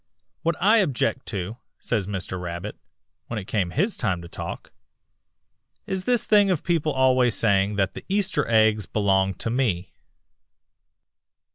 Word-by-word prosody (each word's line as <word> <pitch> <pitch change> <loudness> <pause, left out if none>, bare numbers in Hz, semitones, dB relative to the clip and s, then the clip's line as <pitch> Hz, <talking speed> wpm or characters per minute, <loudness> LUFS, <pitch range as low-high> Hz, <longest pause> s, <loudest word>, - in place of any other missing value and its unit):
"'What 170 0 0
I 210 +5 +5
object 140 - 0
to,' 100 +2 -4 0.2
says 105 -5 -2
Mr. 95 -2 -4
Rabbit, 85 +4 -5 0.5
when 115 - -4
it 100 - -5
came 95 -3 -1
his 195 - 0
time 95 -7 -1
to - - -9
talk, - - -7 1.1
'is 190 -1 -3
this 245 -2 +2
thing 205 -2 +4
of 180 -5 0
people 165 -4 +1
always 130 -4 +3
saying 100 -1 +2
that 95 -1 0
the - - -8
Easter 195 -1 0
eggs 110 -3 +3
belong 95 -2 +1
to 115 - -3
me.' 105 -9 -1
115 Hz, 145 wpm, -24 LUFS, 95-160 Hz, 1.1 s, I